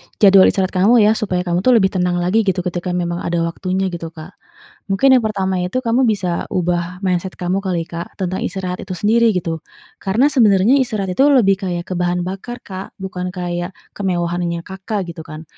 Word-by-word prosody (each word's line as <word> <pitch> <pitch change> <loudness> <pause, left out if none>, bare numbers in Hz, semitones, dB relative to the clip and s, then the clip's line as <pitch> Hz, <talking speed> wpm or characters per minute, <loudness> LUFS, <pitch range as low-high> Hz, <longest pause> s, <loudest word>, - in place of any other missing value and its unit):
jadwal 195 -2 +7
istirahat 190 -1 +1
kamu 210 +5 +4
ya, 210 - +5
supaya 185 -5 -1
kamu 175 -1 0
tuh 245 +6 +4
lebih 190 -4 +3
tenang 180 -1 0
lagi 185 +6 +2
gitu 185 -1 +1
ketika 180 0 -3
memang 175 -1 -2
ada 170 -1 -1
waktunya 185 +2 -2
gitu 170 -1 -5
Kak. 160 +3 -11 0.5
Mungkin 200 +8 +3
yang - - +5
pertama 190 -3 -1
itu 180 +8 -1
kamu 240 +2 +2
bisa 185 -6 -1
ubah 180 +1 -2
mindset 185 0 -1
kamu 180 +1 0
kali 185 -4 -2
Kak 170 0 -7
tentang 185 -1 -2
istirahat 185 -1 -4
itu 185 - -6
sendiri 225 +5 +3
gitu. 165 -2 -2 0.4
Karena 215 +8 +2
sebenarnya 220 -2 +4
istirahat 215 -7 -1
itu 265 - +2
lebih 195 -8 +4
kayak 175 0 -3
ke - - -1
bahan 175 0 0
bakar 195 +7 -6
Kak, 190 -1 -8
bukan 185 -1 -4
kayak 175 +1 -4 0.2
kemewahannya 175 -3 -2
Kakak 190 +2 -4
gitu 165 - -11
kan, 155 +1 -8
185 Hz, 190 wpm, -18 LUFS, 175-200 Hz, 0.5 s, jadwal